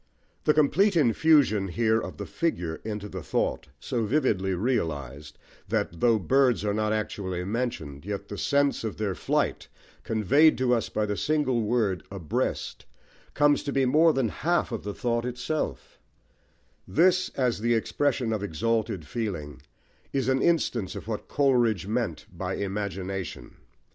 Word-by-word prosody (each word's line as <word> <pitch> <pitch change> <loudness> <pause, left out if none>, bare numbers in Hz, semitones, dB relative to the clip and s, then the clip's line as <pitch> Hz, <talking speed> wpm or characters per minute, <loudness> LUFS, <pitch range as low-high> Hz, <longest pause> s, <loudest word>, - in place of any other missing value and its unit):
The 150 - +5
complete 180 +7 +3
infusion 140 - +4
here 110 +4 +2
of - - -7
the - - -5
figure 90 - -2
into 105 -1 -4
the 95 -2 -6
thought, 80 - -1
so 115 - -2
vividly 100 -7 +1
realised, 75 - -2 0.3
that, 85 - -1
though 115 -2 +4
birds 125 +2 +2
are 105 - +1
not 110 0 0
actually 95 -4 -2
mentioned, 95 - -3
yet 100 +1 -5
the 105 - -6
sense 140 -2 +1
of 110 - -4
their 105 -3 -1
flight, - - -1 0.3
conveyed 125 - +4
to 125 -1 +2
us 115 - 0
by 105 - -1
the 105 -1 -2
single 145 -3 +1
word 105 -4 0
"abreast," 95 -6 -3 0.5
comes 145 0 +4
to 145 - -4
be 135 -1 +2
more 155 +6 +5
than 135 -6 0
half 170 +5 0
of 115 - -3
the 105 0 -5
thought 120 -1 -1
itself: 125 - -4 0.9
this, 180 - +3
as 125 -5 +1
the 120 +1 +2
expression 120 0 0
of 110 - -2
exalted 105 0 -1
feeling, 75 - -4 0.5
is 135 -3 -1
an 130 0 +2
instance 125 - +1
of - - -8
what 110 -2 -4
Coleridge 120 - +2
meant 110 -5 -2
by - - -3
Imagination. 95 -2 -4
110 Hz, 150 wpm, -27 LUFS, 95-130 Hz, 0.9 s, The